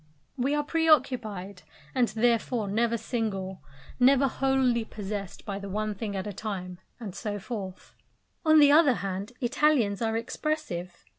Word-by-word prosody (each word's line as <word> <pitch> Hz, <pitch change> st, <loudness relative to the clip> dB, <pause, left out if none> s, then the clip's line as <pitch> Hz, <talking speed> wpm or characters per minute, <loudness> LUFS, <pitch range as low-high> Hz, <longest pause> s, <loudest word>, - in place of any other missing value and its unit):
We 275 Hz, +2 st, 0 dB
are 295 Hz, -, +1 dB
pre 325 Hz, +2 st, 0 dB
occupied, 215 Hz, -10 st, +1 dB, 0.3 s
and 250 Hz, -2 st, +3 dB
therefore 230 Hz, -1 st, +1 dB
never 230 Hz, +3 st, +1 dB
single, 205 Hz, -5 st, -3 dB, 0.4 s
never 270 Hz, +2 st, +5 dB
wholly 265 Hz, -3 st, +1 dB
possessed 205 Hz, -3 st, -6 dB
by 200 Hz, -1 st, -4 dB
the 200 Hz, 0 st, -7 dB
one 215 Hz, +2 st, -2 dB
thing 205 Hz, 0 st, -5 dB
at 190 Hz, -, -3 dB
a 205 Hz, -, -4 dB
time; 185 Hz, -3 st, -5 dB, 0.2 s
and 210 Hz, -6 st, -6 dB
so 205 Hz, 0 st, -4 dB
forth. 200 Hz, -3 st, -7 dB, 0.5 s
On 315 Hz, -1 st, +6 dB
the 290 Hz, -1 st, +7 dB
other 295 Hz, -4 st, +6 dB
hand, 195 Hz, +4 st, -4 dB
Italians 245 Hz, -5 st, +2 dB
are 225 Hz, -1 st, 0 dB
expressive. 230 Hz, -, -4 dB
225 Hz, 150 wpm, -28 LUFS, 200-260 Hz, 0.5 s, the